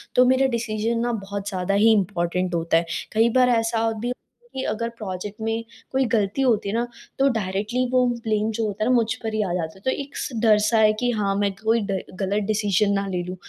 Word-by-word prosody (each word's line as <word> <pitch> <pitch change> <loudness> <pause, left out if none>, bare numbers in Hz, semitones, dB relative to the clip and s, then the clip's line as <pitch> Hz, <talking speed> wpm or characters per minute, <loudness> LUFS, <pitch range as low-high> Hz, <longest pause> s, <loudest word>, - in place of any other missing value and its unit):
तो 250 - +6
मेरा 260 +1 +4
डिसीजन 225 0 -1
ना 240 +1 0
बहुत 200 -1 -5
ज़्यादा 185 0 -2
ही 215 +3 +5
इम्पोर्टेंट 180 -3 0
होता 165 0 +2
है। 170 - 0 0.3
कई 225 +2 +4
बार 250 -1 +5
ऐसा 225 -1 +1
भी 245 +2 -2 0.4
कि 265 - -3
अगर 230 +1 -2
प्रोजेक्ट 205 0 -6
में 225 +1 -1 0.3
कोई 265 0 +2
गलती 210 +4 +1
होती 225 -6 +2
है 205 - -2
ना 240 +1 0 0.3
तो 275 - +5
डायरेक्टली 210 +5 -1
वो 255 -1 +4 0.2
ब्लेम 215 0 0
जो 225 +1 -1
होता 210 0 -2
है 225 - +1
ना 255 - +4
मुझ 225 -2 +2
पर 220 -1 -3
ही 215 - +1
आ 185 - -3
जाता 165 0 -3
है। - - -18
तो - - +2
एक 280 0 -9
स - - -3
डर 215 -2 +6
सा 220 +2 +2
है 215 -1 +6
कि 245 -1 +1
हाँ, 200 -3 0
मैं 200 0 +1
कोई 225 +1 +3
ग़लत 195 +2 -2
डिसीजन 210 -2 +2
ना 200 0 0
ले 180 -2 -2
लूँ। 180 +1 -6
215 Hz, 230 wpm, -23 LUFS, 195-230 Hz, 0.4 s, तो